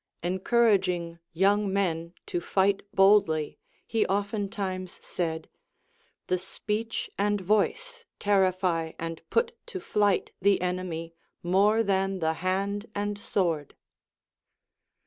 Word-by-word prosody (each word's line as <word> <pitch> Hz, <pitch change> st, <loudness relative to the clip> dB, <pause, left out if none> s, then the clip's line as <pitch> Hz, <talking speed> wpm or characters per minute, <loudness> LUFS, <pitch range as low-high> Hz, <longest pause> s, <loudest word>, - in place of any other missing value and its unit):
Encouraging 185 Hz, -3 st, +2 dB
young 200 Hz, +3 st, +2 dB
men 170 Hz, -3 st, -1 dB
to 175 Hz, -, -2 dB
fight 195 Hz, +2 st, +2 dB
boldly, 195 Hz, -6 st, +3 dB, 0.3 s
he 225 Hz, -1 st, +1 dB
oftentimes 200 Hz, -2 st, -2 dB
said. 160 Hz, -2 st, -3 dB, 0.8 s
The 185 Hz, -, 0 dB
speech 215 Hz, +4 st, -3 dB
and 205 Hz, 0 st, +2 dB
voice 465 Hz, -, 0 dB
terrify 185 Hz, -5 st, +1 dB
and 165 Hz, 0 st, -5 dB
put 465 Hz, 0 st, +1 dB
to 395 Hz, -6 st, -5 dB
flight 205 Hz, -, +1 dB
the 200 Hz, +1 st, +4 dB
enemy 180 Hz, -2 st, -3 dB, 0.3 s
more 200 Hz, +5 st, +3 dB
than 195 Hz, -1 st, +1 dB
the 160 Hz, -2 st, 0 dB
hand 200 Hz, +3 st, -1 dB
and 205 Hz, 0 st, -1 dB
sword. 165 Hz, -8 st, -1 dB
195 Hz, 105 wpm, -28 LUFS, 175-205 Hz, 0.8 s, the